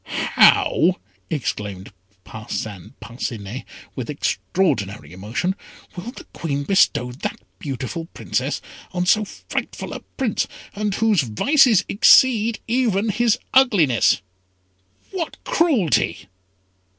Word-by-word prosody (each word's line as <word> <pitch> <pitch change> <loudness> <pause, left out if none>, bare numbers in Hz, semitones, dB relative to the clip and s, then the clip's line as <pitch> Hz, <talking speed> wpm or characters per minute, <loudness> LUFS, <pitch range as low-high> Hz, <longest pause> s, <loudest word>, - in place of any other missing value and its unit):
"How!" 180 +3 +4 0.3
exclaimed 105 - -4 0.3
Parcin 105 0 -7
Parcinet, 115 -1 -6 0.3
with - - -5
extraordinary 100 - -1
emotion; 110 - -2 0.4
"will 180 +5 -6
the - - -11
Queen 145 -3 -3
bestow 140 -8 +2
that 125 - -5 0.2
beautiful 140 +4 -5
Princess - - -2 0.3
on 180 0 -1
so 215 +4 +4
frightful - - -6
a - - -5 0.2
Prince, 255 -7 0 0.3
and 205 0 -2
whose 220 -6 +3
vices 220 - +3
exceed 230 +1 +5
even 225 -4 +1
his 235 +1 +2 0.2
ugliness? 170 - +4 0.9
What 365 -4 -4
cruelty!" 325 - +1
180 Hz, 100 wpm, -21 LUFS, -, 0.9 s, exceed